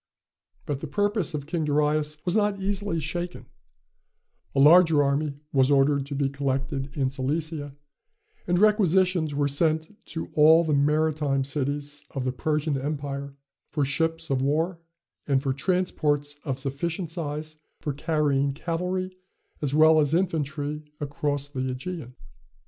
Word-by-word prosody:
But 145 -2 -2
the 160 - -5
purpose 205 +1 0
of 145 -2 -4
King 160 +1 -2
Darius 150 0 +1
was 180 +1 +2
not 205 -2 +1
easily 195 -2 -1
shaken, 175 +4 -4 1.1
A - - +2
larger 160 0 +7
army 140 +1 0 0.2
was 135 -1 +4
ordered 140 0 +3
to 140 - -5
be 140 0 +1
collected 135 0 -3
in 135 -2 +1
Cilicia, 145 +1 -3 0.7
and 175 -1 +2
requisitions 185 -6 +3
were 145 0 +2
sent 160 +5 +1
to 165 - -5
all 160 +2 +6
the 155 -2 0
maritime 150 -1 +2
cities 145 +1 -3
of 130 -2 -2
the 130 - +1
Persian 150 +1 -1
empire 140 -1 -4 0.3
for 145 -2 -1
ships 165 +2 -1
of 130 -1 +1
war, 160 +6 0 0.5
and 135 -2 +2
for 135 -2 0
transports 145 -2 0
of 135 -4 -2
sufficient 155 +6 -3
size 155 -2 -5 0.2
for 145 - -3
carrying 145 -2 +1
cavalry 180 +4 -3 0.5
as 145 -1 -1
well 155 0 +6
as 150 +1 +2
infantry 155 -4 -1 0.2
across 145 -1 -2
the 145 -2 -7
Ægean. 130 +1 -5
150 Hz, 140 wpm, -26 LUFS, 140-165 Hz, 1.1 s, larger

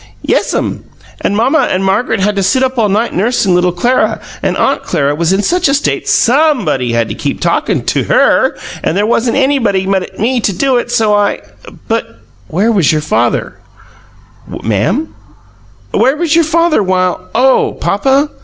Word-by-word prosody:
"Yes'm, - - -1 0.4
and 205 - 0
mamma 260 +8 +2
and 190 +1 -1
Margaret 210 +2 0
had 205 +2 +1
to 200 - 0
sit 255 +8 +1
up 260 -1 -1
all 215 -2 +2
night 215 +4 0
nursin' 200 -1 +1
little 180 0 +2
Clara 240 +9 0 0.2
and - - -1
AUNT - - +1
Clara 140 0 -1
was 165 +3 0
in 195 +2 +1
such 350 - +1
a 275 - +2
state 290 - -2
SOMEBODY 235 - +2
had 115 -1 +1
to - - -3
keep - - -4
talkin' - - -1
to - - 0
HER, - - +2 0.3
and 170 - -1
there 205 - +1
wasn't 235 +2 0
anybody 245 -9 +1
but 190 -1 -2
me 245 +3 0
to 215 - 0
do 260 +7 +1
it, 240 - -3
so 225 -3 +1
I 205 -1 +1 0.2
" - - -16
"But 225 - -3 0.3
where 200 - 0
was 190 -10 +2
your 155 -1 0
father?" 120 -6 -1 0.9
she - - -11
cried. - - -13
"Ma'am?" 115 - 0 0.8
"Where 270 +3 +2
was 330 -2 0
your 335 -1 +4
father 330 -3 +2
while 185 -2 -1
" - - -24
"Oh 260 +3 +3
papa?" 270 +8 +1
215 Hz, 185 wpm, -13 LUFS, 185-265 Hz, 0.9 s, your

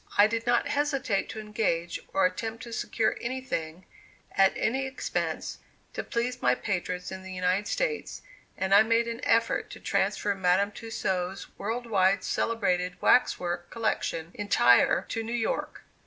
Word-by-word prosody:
I 205 - +8
did 230 +2 -2
not 240 0 +3
hesitate 275 -7 0
to 220 - -6
engage, 210 -6 -1
or 195 - +3
attempt 225 +5 -2
to 235 -2 -8
secure 225 0 0
anything, 210 -10 -4 0.5
at 195 0 +4
any 265 +4 0
expense, 265 - -3 0.3
to - - -3
please 245 +2 -2
my - - +3
patrons 180 -2 -3
in 190 - -6
the 190 0 -9
United 185 +2 0
States, - - -2 0.3
and 190 +1 0
I 200 - +9
made 230 +1 +2
an 235 +1 -4
effort 230 0 +2
to - - -9
transfer 205 - 0
Madame 190 +1 +2
Tussaud's 190 -4 -3
world 230 +4 -3
wide 195 -3 +2
celebrated 180 -6 0
wax 250 - +4
work 175 -1 -3
collection 175 -7 -2
entire 125 -12 +4
to 225 - -2
New 225 +1 -4
York. 235 -2 -2
210 Hz, 155 wpm, -28 LUFS, 185-230 Hz, 0.5 s, I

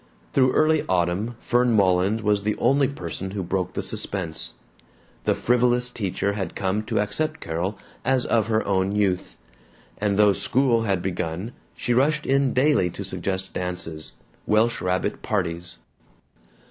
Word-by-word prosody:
Through 130 -1 +4
early 155 0 +3
autumn 90 +6 0
Fern 120 0 +2
Mullins 100 +2 +3
was 105 -1 +2
the 105 +1 -1
only 140 0 +3
person 95 - -5
who 95 0 -4
broke 90 +1 -2
the - - -3
suspense. 85 -5 -3 0.7
The - - +3
frivolous 125 0 +2
teacher 100 -2 -1
had 95 -5 -4
come 95 +2 0
to - - 0
accept 155 +9 -1
Carol 85 +5 -3 0.3
as 130 -1 +2
of 110 -2 +2
her 110 -1 +1
own 95 0 +1
youth, 100 -3 0 0.6
and 100 -1 +1
though 105 -1 +6
school 125 +1 +2
had 95 -4 0
begun 90 +3 -3 0.2
she 120 - -1
rushed 145 +5 +2
in 135 -1 +2
daily 130 -9 +3
to 100 - -6
suggest 95 0 -3
dances, 90 -3 -5 0.3
welsh 115 +2 +2
rabbit 90 0 -1
parties. 90 -3 -2
100 Hz, 145 wpm, -24 LUFS, 90-120 Hz, 0.7 s, though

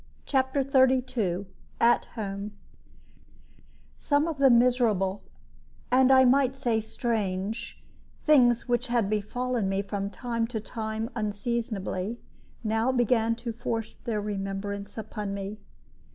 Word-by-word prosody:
CHAPTER 265 0 +1
XXXII 255 -8 +2 0.3
AT 235 +1 +4
HOME 200 -1 -4 1.4
Some 290 +2 +1
of 315 -4 -4
the 275 -1 +6
miserable, 235 -6 +3 0.7
and 260 +1 +5
I 260 0 +7
might 265 +1 +3
say 240 -5 +1
strange, 215 -2 -3 0.5
things 250 -6 +5
which 245 +1 0
had 235 -4 +1
befallen 230 +1 -1
me 195 +1 0
from 200 0 -3
time 230 0 -2
to 230 -2 -3
time 220 +1 -4
unseasonably, 215 -1 -2 0.4
now 225 +3 +1
began 230 -2 +2
to 230 - -2
force 225 -1 -3
their 220 -3 -3
remembrance 200 0 -4
upon 210 -2 -4
me. 200 +2 -5
225 Hz, 115 wpm, -27 LUFS, 205-250 Hz, 1.4 s, I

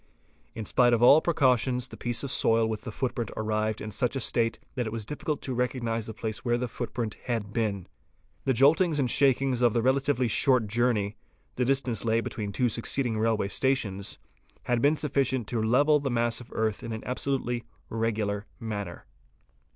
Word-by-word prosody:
In 110 -1 -5
spite 120 +2 +3
of 120 0 +2
all 145 +5 +8
precautions 130 -6 +2
the - - -9
piece 120 +1 -2
of 140 - -2
soil 115 -2 +3
with 110 -1 -3
the 115 - -7
footprint 120 -1 -2
arrived 110 0 -1
in 110 - -5
such 125 +3 0
a - - 0
state 115 -2 0 0.2
that 125 -4 -2
it - - -4
was 110 -2 -4
difficult 150 +3 -4
to 130 - -3
recognise 120 -3 -1
the 110 - -5
place 110 -1 -4
where 120 -1 +1
the 125 +1 -2
footprint 115 -2 -4
had 110 -4 -2
been. 105 -5 -1 0.6
The 130 - +3
joltings 155 +6 +4
and 130 -5 +1
shakings 135 -2 +2
of 120 -3 +4
the 115 - +1
relatively 130 -1 +2
short 125 +1 +3
journey,— 110 -2 0 0.4
the 125 - 0
distance 130 -3 0
lay 115 0 +2
between 105 -3 -4
two 120 +5 +1
succeeding 115 0 -1
railway 110 -3 +1
stations—had 115 0 -2
been 145 +4 +4
sufficient 135 -5 0
to 120 -3 -1
level 145 +7 +4
the 140 -1 -2
mass 120 -1 0
of 120 - -13
earth 110 -2 -1
in 115 - -5
an 110 - -6
absolutely 125 -2 -2 0.2
regular 110 -2 -2
manner. 105 -6 -5
120 Hz, 180 wpm, -27 LUFS, 110-130 Hz, 0.6 s, all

